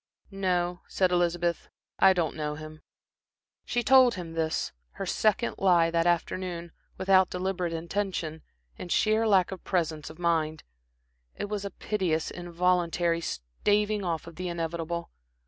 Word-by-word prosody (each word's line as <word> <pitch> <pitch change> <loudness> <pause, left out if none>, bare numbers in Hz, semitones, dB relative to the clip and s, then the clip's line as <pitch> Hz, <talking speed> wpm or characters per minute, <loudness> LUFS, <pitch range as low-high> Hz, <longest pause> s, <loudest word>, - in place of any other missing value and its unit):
"No," 180 -2 0
said 185 -1 +1
Elizabeth. 175 -1 0 0.3
"I 190 0 +7
don't 170 -4 -1
know 150 -1 -3
him." 155 0 -10 0.8
She 240 0 0
told 255 0 +6
him 170 -3 -6
this, 160 -1 -1 0.2
her - - -5
second 220 +3 +1
lie 175 -3 +4
that 170 0 +2
afternoon, 175 0 -1 0.3
without 190 -1 +4
deliberate 180 -1 -2
intention, 165 -1 -3 0.4
in 180 - -7
sheer 220 +4 +3
lack 190 -4 +4
of 190 - -7
presence 160 -4 -1
of 155 - -12
mind. 160 -3 0 0.7
It 205 - -4
was 205 -1 -3
a - - -2
piteous, 180 -5 -1
involuntary 175 -1 0
staving 205 - 0
off 170 -3 -2
of 170 -1 -11
the 185 0 -3
inevitable. 170 0 -3
175 Hz, 140 wpm, -28 LUFS, 165-190 Hz, 0.8 s, I